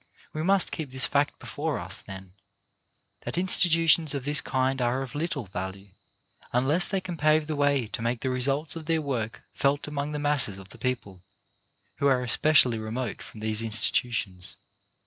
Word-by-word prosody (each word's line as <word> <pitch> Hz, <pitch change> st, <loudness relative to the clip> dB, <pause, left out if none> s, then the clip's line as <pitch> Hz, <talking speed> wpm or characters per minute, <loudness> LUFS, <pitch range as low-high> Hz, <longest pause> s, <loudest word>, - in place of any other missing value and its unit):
We 155 Hz, -, -3 dB
must 195 Hz, +3 st, +2 dB
keep 155 Hz, -5 st, -4 dB
this 130 Hz, +1 st, +1 dB
fact 145 Hz, +1 st, +1 dB
before 150 Hz, -2 st, -3 dB
us, 95 Hz, +2 st, -3 dB
then; 95 Hz, -2 st, -10 dB, 0.9 s
that -, -, -5 dB
institutions 165 Hz, -4 st, +4 dB
of 135 Hz, -2 st, -4 dB
this 145 Hz, 0 st, +3 dB
kind 130 Hz, 0 st, 0 dB
are 125 Hz, +2 st, +1 dB
of 130 Hz, -, -9 dB
little 150 Hz, -4 st, -2 dB
value 95 Hz, +1 st, -6 dB, 0.6 s
unless 140 Hz, +9 st, +2 dB
they 195 Hz, -, -1 dB
can 185 Hz, -2 st, -6 dB
pave 155 Hz, 0 st, +3 dB
the 155 Hz, 0 st, -3 dB
way 145 Hz, -3 st, +2 dB
to 115 Hz, -, -4 dB
make 115 Hz, +1 st, -1 dB
the 130 Hz, -, -1 dB
results 135 Hz, +5 st, 0 dB
of 160 Hz, -2 st, -7 dB
their 165 Hz, -1 st, +2 dB
work 125 Hz, -7 st, -3 dB
felt 140 Hz, +1 st, 0 dB
among 150 Hz, 0 st, -3 dB
the -, -, -2 dB
masses 145 Hz, -9 st, +1 dB
of 95 Hz, 0 st, -12 dB
the -, -, -13 dB
people 110 Hz, -8 st, -3 dB, 0.8 s
who 140 Hz, -, +2 dB
are 130 Hz, -2 st, +3 dB
especially 125 Hz, -1 st, +3 dB
remote 110 Hz, +1 st, -4 dB
from 110 Hz, -, -11 dB
these 110 Hz, 0 st, 0 dB
institutions. 110 Hz, -4 st, 0 dB
135 Hz, 175 wpm, -27 LUFS, 115-150 Hz, 0.9 s, institutions